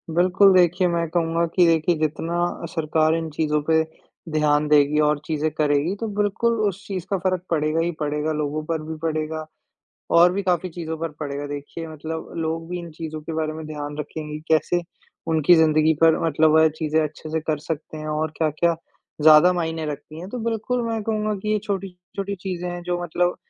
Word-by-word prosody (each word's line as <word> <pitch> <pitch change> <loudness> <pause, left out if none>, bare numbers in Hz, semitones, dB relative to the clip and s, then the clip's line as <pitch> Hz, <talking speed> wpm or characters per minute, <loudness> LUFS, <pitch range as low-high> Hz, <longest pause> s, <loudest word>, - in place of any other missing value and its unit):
बिल्कुल, 185 +3 +5
देखिए 180 0 +4
मैं 170 -1 0
कहूँगा 165 0 +1
कि 180 - +6
देखिए 165 +1 +3
जितना 155 +2 -1 0.3
अ, - - -2
सरकार 155 -1 +1
इन 165 -1 -3
चीज़ों 150 -1 0
पे 160 0 +5 0.5
ध्यान 150 -1 +2
देगी 150 0 +4
और 150 -1 +1
चीज़ें 155 0 0
करेगी 150 +3 +1
तो 225 - -2
बिल्कुल 210 +3 +1
उस 200 +1 -5
चीज़ 185 -3 -4
का 195 - +1
फ़र्क 185 -1 0
पड़ेगा 155 -1 +1
ही 170 +1 +1
पड़ेगा 150 +1 -1
लोगों 150 0 -2
पर 160 -1 -2
भी 160 +1 -5
पड़ेगा 155 -1 -2 0.7
और 175 +1 +7
भी 200 +2 -1
काफ़ी 180 -1 0
चीज़ों 160 -1 -5
पर 165 - -2
पड़ेगा। 145 -1 -4
देखिए 145 +3 -6
मतलब 160 +1 -6
लोग 165 0 -3
भी 180 - -3
इन 170 -1 -8
चीज़ों 155 0 -6
के 160 - -6
बारे 155 -1 -1
में 155 0 -7
ध्यान 145 -1 -6
रखेंगे 150 0 -5
कि - - -13
कैसे 165 +2 +2 0.5
उनकी 160 +2 +5
ज़िंदगी 155 -1 +4
पर 165 -1 +5
मतलब 160 0 +3
वह 160 0 +6
चीज़ें 155 0 +1
अच्छे 155 +1 -6
से 160 +1 0
कर 155 -1 -1
सकते 155 +1 -5
हैं 155 - -6
और 155 0 -1
क्या-क्या 165 +2 +1 0.5
ज़्यादा 155 +3 +8
मायने 160 -2 -2
रखती 150 +2 -7
हैं 180 - -7
तो 250 - -4
बिल्कुल 230 +2 -1
मैं 225 -1 -2
कहूँगा 215 0 -1
कि 210 - -3
ये 215 - +2
छोटी-छोटी 195 0 -4
चीज़ें 180 -2 -4
हैं 175 0 -6
जो 175 0 -2
मतलब 175 +1 0
160 Hz, 195 wpm, -23 LUFS, 155-175 Hz, 0.7 s, ज़्यादा